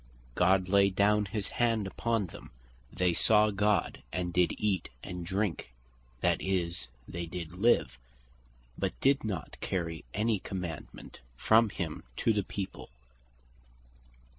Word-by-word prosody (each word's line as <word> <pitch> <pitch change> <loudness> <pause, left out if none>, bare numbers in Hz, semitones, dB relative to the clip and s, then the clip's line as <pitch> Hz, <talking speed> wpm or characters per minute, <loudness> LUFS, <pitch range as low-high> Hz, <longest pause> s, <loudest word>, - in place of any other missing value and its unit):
"God 95 +5 +3
laid 100 0 +3
not 105 0 +4
his 105 0 -3
hand 115 -3 +2
upon 115 +2 0
them, 85 - -11 0.4
they 90 -1 +1
saw 105 +4 +4
God 105 +1 +1
and 90 +1 -2
did 90 0 +3
eat 100 -5 0
and 90 -1 -5
drink" 95 - -2 0.5
(that - - +2
is, 90 -6 -1 0.2
did 85 0 -5
live), 95 - +2 0.8
but - - -2
did 135 +1 +3
not 100 -7 -4
carry 85 -3 -2
any 110 - +1
commandement 90 -5 -7 0.2
from 110 - +5
him 85 -5 -4 0.2
to 115 - +3
the 105 - +1
people. 95 0 -6
95 Hz, 125 wpm, -31 LUFS, 90-105 Hz, 0.8 s, from